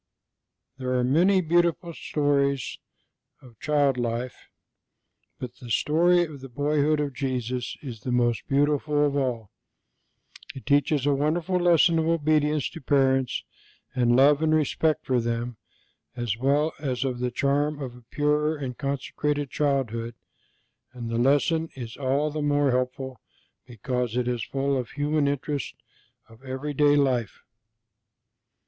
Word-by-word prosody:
There 130 Hz, -1 st, -2 dB
are 125 Hz, -1 st, +1 dB
many 175 Hz, +9 st, +4 dB
beautiful 170 Hz, 0 st, +1 dB
stories 140 Hz, -4 st, 0 dB, 0.6 s
of 120 Hz, -4 st, -18 dB
child 145 Hz, -3 st, +2 dB
life, 120 Hz, +1 st, -4 dB, 0.9 s
but 125 Hz, -1 st, -8 dB
the 120 Hz, -, -11 dB
story 175 Hz, +8 st, +3 dB
of 150 Hz, -5 st, -8 dB
the 135 Hz, -, -9 dB
Boyhood 150 Hz, +3 st, +1 dB
of 145 Hz, -2 st, -2 dB
Jesus 125 Hz, -2 st, -3 dB
is 120 Hz, -6 st, -7 dB
the 125 Hz, -, -4 dB
most 120 Hz, -2 st, +1 dB
beautiful 145 Hz, +1 st, +2 dB
of 145 Hz, -1 st, 0 dB
all. 125 Hz, -7 st, -2 dB, 1.0 s
It 135 Hz, -, -9 dB
teaches 145 Hz, 0 st, +2 dB
a 145 Hz, -, +3 dB
wonderful 165 Hz, +6 st, 0 dB
lesson 170 Hz, -1 st, +4 dB
of 160 Hz, -, 0 dB
obedience 155 Hz, -2 st, +2 dB
to 165 Hz, -, -9 dB
parents 135 Hz, -2 st, +1 dB, 0.5 s
and 120 Hz, -2 st, +2 dB
love 140 Hz, +3 st, +5 dB
and 155 Hz, 0 st, +3 dB
respect 155 Hz, 0 st, +1 dB
for 125 Hz, -2 st, +1 dB
them, 115 Hz, 0 st, -3 dB, 0.6 s
as 120 Hz, -4 st, -2 dB
well 140 Hz, +6 st, +1 dB
as 130 Hz, -4 st, -2 dB
of 130 Hz, -2 st, -2 dB
the 125 Hz, 0 st, 0 dB
charm 140 Hz, +4 st, 0 dB
of 130 Hz, -4 st, -6 dB
a 125 Hz, -, -14 dB
pure 150 Hz, +1 st, +1 dB
and 130 Hz, -4 st, -5 dB
consecrated 140 Hz, +1 st, -2 dB
childhood, 120 Hz, -5 st, -1 dB, 0.8 s
and 120 Hz, -2 st, -6 dB
the 115 Hz, -, 0 dB
lesson 150 Hz, +5 st, +2 dB
is 120 Hz, -4 st, -7 dB
all 140 Hz, +3 st, 0 dB
the 155 Hz, +1 st, -3 dB
more 145 Hz, -1 st, +2 dB
helpful 130 Hz, 0 st, -2 dB, 0.5 s
because 125 Hz, 0 st, -3 dB
it 125 Hz, -1 st, 0 dB
is 120 Hz, -2 st, -1 dB
full 140 Hz, +3 st, -1 dB
of 125 Hz, -, -4 dB
the -, -, -16 dB
human 145 Hz, 0 st, +1 dB
interest 145 Hz, 0 st, -3 dB, 0.5 s
of 115 Hz, +3 st, -18 dB
everyday 145 Hz, +2 st, +1 dB
life. 130 Hz, -7 st, 0 dB
140 Hz, 140 wpm, -26 LUFS, 125-150 Hz, 1.0 s, love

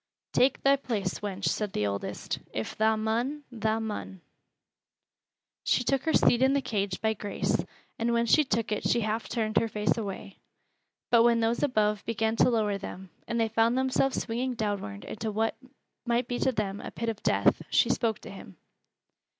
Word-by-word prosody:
"Tak' 260 Hz, +1 st, +3 dB
thy 275 Hz, 0 st, +5 dB
place, 210 Hz, -8 st, -2 dB
wench," 200 Hz, -1 st, -4 dB
said 210 Hz, -2 st, -1 dB
the 105 Hz, -, 0 dB
oldest. 100 Hz, 0 st, -3 dB
"If 110 Hz, -, -4 dB
tha 220 Hz, 0 st, +2 dB
mun, 235 Hz, +7 st, -1 dB
tha 220 Hz, -1 st, 0 dB
mun." 210 Hz, -4 st, -5 dB, 1.4 s
She 245 Hz, -, +2 dB
took 270 Hz, +3 st, 0 dB
her 320 Hz, -, +1 dB
seat 240 Hz, -, +4 dB
in 265 Hz, +1 st, +4 dB
the 280 Hz, -, +3 dB
cage 200 Hz, -5 st, -2 dB
by 220 Hz, 0 st, +2 dB
Grace, 205 Hz, -1 st, -2 dB, 0.4 s
and 230 Hz, +1 st, +1 dB
when 235 Hz, 0 st, +2 dB
she 305 Hz, +7 st, +5 dB
took 225 Hz, -4 st, -1 dB
it 210 Hz, -, 0 dB
she 235 Hz, -, +2 dB
half 215 Hz, +1 st, -2 dB
turned 215 Hz, -3 st, -1 dB
her 230 Hz, -, +3 dB
face 210 Hz, 0 st, 0 dB
away. 195 Hz, -2 st, -6 dB, 0.7 s
But 235 Hz, -1 st, +7 dB
when 235 Hz, 0 st, +4 dB
those 230 Hz, +1 st, +1 dB
above 210 Hz, -6 st, +1 dB
began 225 Hz, 0 st, 0 dB
to -, -, +5 dB
lower 210 Hz, -4 st, +1 dB
them, 190 Hz, -1 st, -8 dB, 0.2 s
and 235 Hz, -, -1 dB
they 225 Hz, -, +3 dB
found 225 Hz, +2 st, +2 dB
themselves 260 Hz, 0 st, +1 dB
swinging 245 Hz, +2 st, -2 dB
downward 200 Hz, -, -3 dB
into 220 Hz, 0 st, -4 dB
what 220 Hz, +2 st, 0 dB, 0.5 s
might 240 Hz, 0 st, 0 dB
be 245 Hz, 0 st, -2 dB
to 265 Hz, -, +2 dB
them 205 Hz, -4 st, -3 dB
a -, -, -6 dB
pit 230 Hz, 0 st, -3 dB
of 220 Hz, -2 st, -5 dB
death, -, -, +3 dB
she -, -, +3 dB
spoke 225 Hz, -3 st, 0 dB
to -, -, -9 dB
him. 145 Hz, -, -11 dB
225 Hz, 185 wpm, -28 LUFS, 210-235 Hz, 1.4 s, But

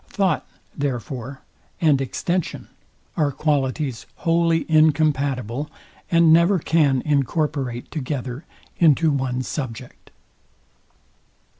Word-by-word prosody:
Thought, 195 Hz, -3 st, 0 dB, 0.3 s
therefore, 135 Hz, 0 st, -4 dB, 0.4 s
and 150 Hz, -5 st, +3 dB
extension 175 Hz, +6 st, -3 dB, 0.5 s
are 150 Hz, -3 st, +1 dB
qualities 135 Hz, -4 st, -1 dB
wholly 165 Hz, -1 st, +1 dB
incompatible, 145 Hz, -4 st, +1 dB, 0.4 s
and 170 Hz, -2 st, +5 dB
never 170 Hz, +4 st, +5 dB
can 150 Hz, -5 st, +2 dB
incorporate 140 Hz, -3 st, -1 dB
together 135 Hz, -2 st, -4 dB, 0.4 s
into 160 Hz, -1 st, +4 dB
one 130 Hz, -2 st, -1 dB
subject. 125 Hz, -4 st, -7 dB
145 Hz, 85 wpm, -22 LUFS, 130-160 Hz, 0.5 s, and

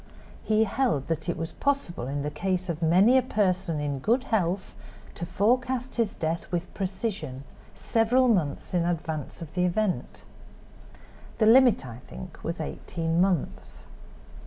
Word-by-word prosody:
He 220 Hz, 0 st, +3 dB
held 220 Hz, -, 0 dB
that 165 Hz, +1 st, -2 dB
it 170 Hz, -, -1 dB
was 165 Hz, 0 st, -4 dB
possible 275 Hz, -, -1 dB
in 140 Hz, +1 st, -2 dB
the 150 Hz, -, -2 dB
case 185 Hz, +3 st, -2 dB
of 165 Hz, -1 st, -3 dB
many 190 Hz, +10 st, +5 dB
a -, -, +2 dB
person 190 Hz, -, 0 dB
in 145 Hz, -2 st, -2 dB
good 235 Hz, -, +2 dB
health 190 Hz, -6 st, -1 dB, 0.4 s
to 170 Hz, -, -6 dB
forecast 250 Hz, +8 st, 0 dB
his 225 Hz, -4 st, 0 dB
death 165 Hz, +1 st, -3 dB
with 175 Hz, 0 st, -3 dB
precision, 190 Hz, -, -3 dB, 0.3 s
several 245 Hz, +3 st, +2 dB
months 175 Hz, -12 st, 0 dB
in 175 Hz, -2 st, +2 dB
advance 160 Hz, -3 st, -3 dB
of 155 Hz, -, -11 dB
the 180 Hz, -, +1 dB
event. 185 Hz, +2 st, -1 dB, 1.1 s
The 220 Hz, -, +3 dB
limit, 240 Hz, -, +6 dB
I 120 Hz, -1 st, -8 dB
think, 185 Hz, -4 st, -10 dB
was 165 Hz, +1 st, -3 dB
eighteen 165 Hz, +1 st, -2 dB
months. 180 Hz, -, -1 dB
180 Hz, 150 wpm, -27 LUFS, 165-220 Hz, 1.1 s, limit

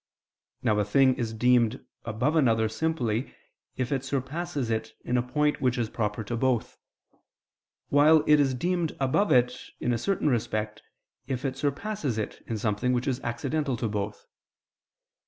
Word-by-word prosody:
Now 105 Hz, -1 st, +2 dB
a -, -, +3 dB
thing 130 Hz, +6 st, +4 dB
is 115 Hz, -2 st, -2 dB
deemed 120 Hz, +1 st, +2 dB, 0.2 s
above 120 Hz, +8 st, 0 dB
another 115 Hz, -7 st, +3 dB
simply 120 Hz, -2 st, -1 dB, 0.4 s
if 130 Hz, 0 st, -2 dB
it 135 Hz, -2 st, 0 dB
surpasses 140 Hz, 0 st, -3 dB
it 110 Hz, 0 st, -3 dB
in 125 Hz, -, 0 dB
a 125 Hz, -, +3 dB
point 150 Hz, +4 st, 0 dB
which 125 Hz, -1 st, +1 dB
is 115 Hz, -2 st, -1 dB
proper 105 Hz, -1 st, -2 dB
to 120 Hz, +3 st, -3 dB
both; 125 Hz, -1 st, 0 dB, 1.1 s
while 150 Hz, +2 st, +6 dB
it 150 Hz, 0 st, +6 dB
is 135 Hz, -2 st, +2 dB
deemed 175 Hz, +3 st, -1 dB
above 140 Hz, +10 st, +2 dB
it 125 Hz, 0 st, +3 dB, 0.2 s
in 125 Hz, -, 0 dB
a 115 Hz, -, -1 dB
certain 190 Hz, -, 0 dB
respect, 110 Hz, -4 st, -1 dB, 0.5 s
if 130 Hz, +1 st, -3 dB
it 130 Hz, -1 st, -1 dB
surpasses 145 Hz, -, -2 dB
it 110 Hz, -, -4 dB
in 115 Hz, -, -2 dB
something 110 Hz, +4 st, 0 dB
which 125 Hz, +2 st, -1 dB
is 130 Hz, -2 st, 0 dB
accidental 135 Hz, +3 st, -2 dB
to 115 Hz, -, -1 dB
both. 105 Hz, -1 st, -4 dB
125 Hz, 160 wpm, -27 LUFS, 115-145 Hz, 1.1 s, while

